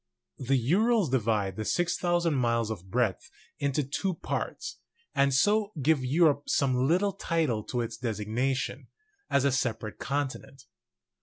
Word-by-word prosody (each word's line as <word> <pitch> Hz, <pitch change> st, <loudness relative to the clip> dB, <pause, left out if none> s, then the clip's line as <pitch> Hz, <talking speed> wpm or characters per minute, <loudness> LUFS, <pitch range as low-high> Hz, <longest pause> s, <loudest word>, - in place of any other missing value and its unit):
The 135 Hz, +1 st, +1 dB
Urals 190 Hz, -, +2 dB
divide 105 Hz, -6 st, 0 dB
the 110 Hz, -, -2 dB
6,000 175 Hz, +3 st, +1 dB
miles 115 Hz, -4 st, +1 dB
of 95 Hz, -3 st, -7 dB
breadth 115 Hz, -3 st, 0 dB, 0.3 s
into 140 Hz, +1 st, 0 dB
two 165 Hz, +7 st, -2 dB
parts, -, -, -4 dB, 0.3 s
and 140 Hz, 0 st, +3 dB
so 205 Hz, +9 st, +2 dB
give 145 Hz, 0 st, +2 dB
Europe 145 Hz, +1 st, +2 dB
some 135 Hz, -2 st, +2 dB, 0.5 s
title 155 Hz, -10 st, 0 dB
to 125 Hz, -, -2 dB
its 115 Hz, -, -4 dB
designation 120 Hz, +3 st, -2 dB, 0.4 s
as 140 Hz, -1 st, +2 dB
a 140 Hz, -, +4 dB
separate 110 Hz, -4 st, -2 dB
continent. 135 Hz, -1 st, -4 dB
135 Hz, 130 wpm, -28 LUFS, 115-160 Hz, 0.5 s, a